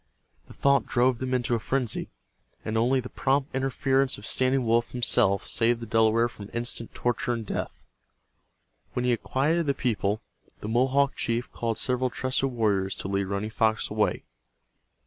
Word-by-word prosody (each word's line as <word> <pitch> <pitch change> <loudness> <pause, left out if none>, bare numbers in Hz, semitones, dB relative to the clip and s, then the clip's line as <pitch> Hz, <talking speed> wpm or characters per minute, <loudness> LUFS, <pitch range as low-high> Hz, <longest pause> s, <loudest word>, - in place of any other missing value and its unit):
The - - -14
thought 140 0 +2
drove 125 0 +2
them 130 0 -3
into 125 -2 0
a 115 - +1
frenzy, 125 0 -2 0.6
and 110 - -3
only 125 +4 +2
the 125 - -7
prompt 135 +1 0
interference 135 0 +1
of 105 - -10
Standing 130 +1 +2
Wolf 115 +1 +2
himself 115 -5 +3
saved 115 0 +1
the 115 - -6
Delaware 115 +1 +3
from 105 -3 -11
instant 115 -1 -2
torture 120 0 -1
and 115 -2 -4
death. - - -5 1.1
When 125 - -1
he 125 - +3
had 120 - 0
quieted 155 +5 0
the 140 - +1
people, 110 -4 -1 0.4
the - - -6
Mohawk 135 +4 +2
chief 115 +2 -2
called 115 -2 -2
several 125 0 0
trusted 130 +3 -1
warriors 105 -6 0
to - - -6
lead 100 0 0
Running 100 +3 -3
Fox 110 0 0
away. - - 0
120 Hz, 165 wpm, -26 LUFS, 110-130 Hz, 1.1 s, himself